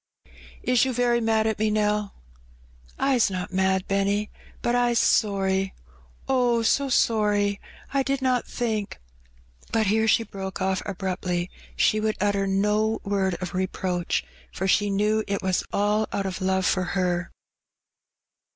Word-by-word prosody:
Is 250 -2 +3
you 260 -1 0
very 240 0 +2
mad 220 -1 +2
at 220 -1 -1
me, 215 0 +2
Nell?" 210 -1 0 0.4
'' - - -28
I*s 245 -5 +3
not 185 -1 -5
mad, 190 0 +1
Benny, 200 +1 0 0.3
but 240 - +1
I*s 245 -1 +2
sorry 195 -3 +1 0.2
— - - -29 0.3
oh, 245 -3 +2
so 275 +4 +2
sorry! 210 -4 +2 0.3
I 275 - +3
did 275 0 -1
not 255 -2 0
think 220 -4 -3 0.4
" - - -28
But 225 -1 +2
here 220 +2 +2
she 230 - +4
broke 195 -3 -7
oflF 190 0 0
abruptly: 185 -2 -2 0.2
she 215 - +3
would 215 0 -1
utter 200 -1 +1
no 210 +3 +1
word 195 -2 0
of 180 - -5
reproach, 185 -1 -1 0.3
for 190 - -3
she 205 +2 +3
knew 210 +2 +1
it 200 -1 -2
was 185 -1 +1
all 210 +2 +1
out 200 - -2
of 190 -1 -4
love 190 0 +1
for 185 - +2
her. 180 -2 0
205 Hz, 155 wpm, -25 LUFS, 190-220 Hz, 0.4 s, she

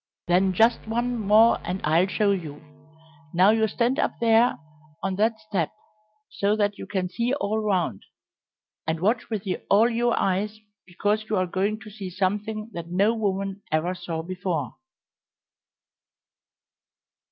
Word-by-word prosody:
"Then 185 +2 +3
just 225 +4 +3
one 240 +2 -1
more 220 +1 +5
and 180 +2 -3
I'll 165 +4 +3
show 200 +1 +1
you. 160 -7 -4 0.8
Now 185 +4 +6
you 220 0 +2
stand 240 +6 0
up - - 0
there 230 +1 +4 0.5
on 195 -1 -1
that 220 +2 +1
step 195 -7 -2 0.6
so 200 +1 +1
that 205 -1 0
you - - -7
can 190 -3 -1
see 235 +8 -1
all 220 -5 -1
round, 180 - -1 0.8
and 160 0 -1
watch 220 +6 0
with 215 -4 -3 0.3
all 225 +4 +5
your 235 +1 +1
eyes, 205 +3 0 0.3
because 205 +4 -1
you 215 - +1
are 185 - +2
going 200 +4 -1
to 215 0 -11
see 195 -2 -7
something 210 +4 -2
that 170 -1 -6
no 195 +6 +2
woman 195 -2 -2
ever 160 +3 +1
saw 165 -3 -5
before." 180 -5 -3
200 Hz, 145 wpm, -25 LUFS, 185-220 Hz, 0.8 s, Now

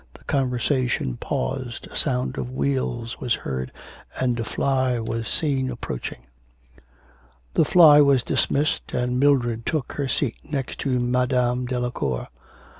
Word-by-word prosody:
The - - -16
conversation 125 - 0
paused, 130 - -3
a - - -11
sound 130 -3 +1
of 125 - -3
wheels 125 -3 -2
was 120 -3 0
heard, 65 -1 -4 0.5
and 125 -2 0
a - - 0
fly 130 +1 0
was 115 0 -3
seen 135 -2 +1
approaching. 65 - -6 1.3
The - - +4
fly 150 -3 +8
was 140 -4 +4
dismissed, 145 +2 0
and 125 0 0
Mildred 120 -5 +2
took 155 -2 -2
her 140 -2 -2
seat 130 -2 -1
next 135 -4 -4
to 130 -3 0
Madame 125 0 +1
Delacour. 120 - -2
125 Hz, 130 wpm, -24 LUFS, 120-135 Hz, 1.3 s, fly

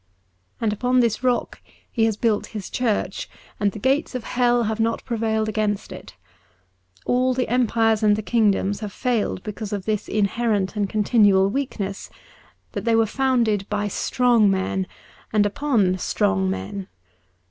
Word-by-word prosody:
And 220 -2 0
upon 250 +4 +1
this 235 -2 +1
rock 250 -2 0 0.3
He 225 -2 +2
has 220 -2 0
built 215 -2 0
His 200 - -7
Church, 220 -6 -1 0.3
and 205 -1 +2
the - - -9
gates 270 +5 0
of 250 - -3
Hell 245 0 +2
have 220 0 -2
not 225 +1 0
prevailed 220 -2 -1
against 210 -2 -1
it. - - -10 0.9
All 255 +1 +2
the 255 - 0
empires 225 -3 +2
and 210 -1 +4
the 215 - -4
kingdoms 205 -3 +1
have 210 -2 -5
failed 230 -5 -1
because 210 0 -6
of 200 -2 -3
this 215 -1 -1
inherent 210 -1 0
and 205 -2 -1
continual 205 -2 +3
weakness, 210 -7 -4 0.6
that - - -4
they 230 -1 +2
were 225 0 +4
founded 230 -4 +1
by 210 0 -1
strong 235 +1 +2
men 190 0 -1 0.4
and 210 -2 +3
upon 205 -5 +1
strong 95 - +1
men. 95 - -4
215 Hz, 155 wpm, -23 LUFS, 200-240 Hz, 0.9 s, and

